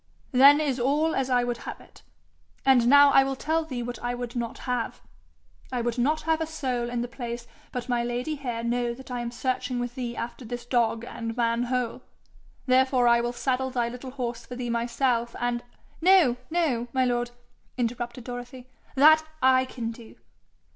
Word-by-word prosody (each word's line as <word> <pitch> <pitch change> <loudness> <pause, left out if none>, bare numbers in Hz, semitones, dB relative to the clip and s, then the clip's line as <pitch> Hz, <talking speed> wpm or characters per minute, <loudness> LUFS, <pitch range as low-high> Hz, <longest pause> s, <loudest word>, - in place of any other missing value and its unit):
'Then 275 +3 +7
is 280 -4 0
all 295 +6 +2
as 265 -1 -1
I 250 -1 +3
would 240 -1 -2
have - - -8
it. - - -18 0.6
And 255 -3 +5
now 285 +2 +8
I 270 - +6
will 270 0 -2
tell 320 +4 0
thee 255 -6 -5
what 245 -1 -5
I 245 0 -2
would 245 -1 -6
not 240 +2 -3
have: 250 -2 -2 0.7
I 250 -2 -1
would 240 +1 -2
not 300 +6 +2
have 320 0 0
a 320 - -1
soul 255 -6 -2
in 240 -1 -2
the 240 - -2
place 235 -1 -6 0.3
but 250 -1 -4
my 240 -1 +1
lady 245 +5 -2
here 245 -5 -4
know 240 0 0
that 265 +1 -12
I 245 - -2
am 240 - -3
searching 250 +1 -2
with 245 0 -3
thee 245 -2 -4
after 240 +2 -5
this 240 +1 -6
dog 235 -2 +1
and 230 -1 -6
man 235 0 +1
hole. 250 -1 -2 0.6
Therefore 255 -1 +3
I 235 0 +5
will 240 0 -1
saddle 260 +1 -1
thy 240 -2 -1
little 250 +2 -8
horse 240 -3 -4
for 250 - -8
thee 245 -1 -3
myself, 235 0 0
and 240 0 -1 0.2
' - - -29
'No, 350 -8 +6
no, 295 -9 0
my 260 -1 +2
lord!' 240 -1 0 0.5
interrupted 240 0 -3
Dorothy. 245 +1 -8 0.3
'That 310 +3 +7 0.2
I 260 0 +5
can 235 -3 -5
do.' 230 -1 -13
245 Hz, 195 wpm, -26 LUFS, 240-265 Hz, 0.7 s, now